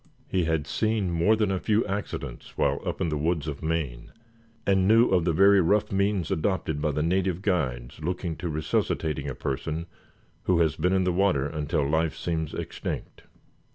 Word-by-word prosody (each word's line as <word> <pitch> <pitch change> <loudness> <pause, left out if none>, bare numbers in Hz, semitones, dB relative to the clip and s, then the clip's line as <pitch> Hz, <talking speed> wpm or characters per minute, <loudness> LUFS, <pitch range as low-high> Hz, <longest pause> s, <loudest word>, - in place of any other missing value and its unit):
He 90 -3 0
had 80 -2 0
seen 105 +5 0
more 85 +6 +3
than 105 -3 +1
a 95 - 0
few 110 +3 +1
accidents 100 +1 -5
while - - +1
up - - -3
in 85 - +1
the 75 - -1
woods 80 0 0
of 70 -2 -5
Maine, 80 -7 -3 0.5
and 95 -1 +3
knew 115 +3 +6
of 90 -3 +2
the 85 - +3
very 100 +3 +6
rough 100 +5 +2
means 100 -3 0
adopted 80 -4 -1
by 75 - +1
the 75 +1 0
native 95 +1 0
guides 70 -10 -1
looking 85 0 -2
to 85 - -4
resuscitating 75 -1 -1
a 65 - -5
person 80 +4 -3 0.6
who 90 - +3
has 80 -3 +2
been 90 +4 +1
in 95 -1 +3
the 90 -1 +1
water 90 -7 +2
until 75 0 -1
life 80 +1 0
seems 80 -3 -2
extinct. - - -5
85 Hz, 185 wpm, -26 LUFS, 75-95 Hz, 0.6 s, knew